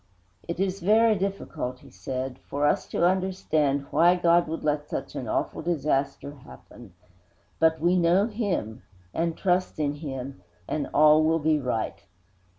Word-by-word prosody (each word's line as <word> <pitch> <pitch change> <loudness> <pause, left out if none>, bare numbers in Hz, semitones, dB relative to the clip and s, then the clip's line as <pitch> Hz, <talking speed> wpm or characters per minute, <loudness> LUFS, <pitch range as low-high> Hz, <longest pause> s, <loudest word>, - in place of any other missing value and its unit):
'It 170 0 -4
is 195 0 -1
very 220 +4 +4
difficult,' 190 -10 -4
he - - -16
said, 130 +7 -5
'for 145 +1 -2
us 145 - +1
to 170 - 0
understand 165 -7 0
why 175 +2 +5
God 175 -1 +3
should 160 +1 -5
let 150 -1 -1
such - - -5
an - - -5
awful - - -2
disaster 145 -4 -1
happen, 120 -6 -15 0.6
but 160 0 +3
we 175 +3 +2
know 180 +3 +3
Him, 205 - -3 0.3
and 165 0 -1
trust 185 -1 0
Him, 140 - -4 0.3
and 150 - -2
all 155 +1 +5
will 160 +1 +3
be 155 -1 +1
right. 125 -5 -3
160 Hz, 150 wpm, -26 LUFS, 140-180 Hz, 0.6 s, why